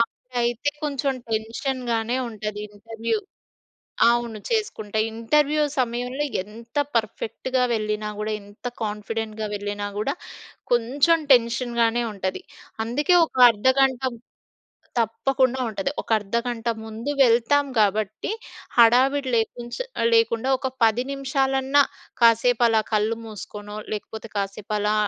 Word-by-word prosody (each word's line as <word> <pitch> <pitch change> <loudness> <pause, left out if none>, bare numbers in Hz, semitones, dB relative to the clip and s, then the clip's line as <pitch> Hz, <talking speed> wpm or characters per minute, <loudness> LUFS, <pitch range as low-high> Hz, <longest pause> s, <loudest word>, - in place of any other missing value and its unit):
అప్పుడైతే 240 +3 -1
కొంచెం 275 -2 0 0.2
టెన్షన్‌గానే 230 +1 -1
ఉంటది 210 -1 -5
ఇంటర్వ్యూ. 225 - -3 0.9
అవును 235 -2 -1
చేసుకుంటే. 220 - -1
ఇంటర్వ్యూ 295 +6 +2 0.2
సమయంలో 250 +3 -1 0.2
ఎంత 230 +5 -11 0.2
పర్ఫెక్ట్‌గా 230 +3 -1
వెళ్ళినా 215 -1 -1
గూడా, 215 +1 -2
ఎంత 205 +4 -18 0.2
కాన్ఫిడెంట్‌గా 215 +1 -3
వెళ్ళినా 205 0 -4
గూడా, 270 +7 0 0.6
కొంచెం 270 +8 +3
టెన్షన్‌గానే 235 -1 +2
ఉంటది. 190 -1 -3 0.4
అందుకే 295 +10 +1
ఒక - - -20 0.2
అర్ధగంట 260 +4 +2 1.0
తప్పకుండా 255 +3 +1
ఉంటది. 275 +6 -2
ఒక - - -25
అర్ధగంట 235 +3 -3 0.2
ముందు 225 +5 -5
వెళ్తాం 245 +4 +3
కాబట్టి, 215 - 0 0.5
హడావిడి 260 +4 +5
లేకుంచే 240 - -2 0.3
లేకుండా 230 +2 +2
ఒక 265 - -2 0.2
10 225 +3 +2
నిమిషాలన్నా 270 0 +2 0.4
కాసేపు 235 +1 +5
అలా 220 -1 +3
కళ్ళు 215 +2 +1
మూసుకోనో, 210 -1 -8 0.2
లేకపోతే 220 +1 -7
కాసేపు 200 +1 -3
అలా 210 +1 +1
230 Hz, 105 wpm, -24 LUFS, 215-260 Hz, 1.0 s, హడావిడి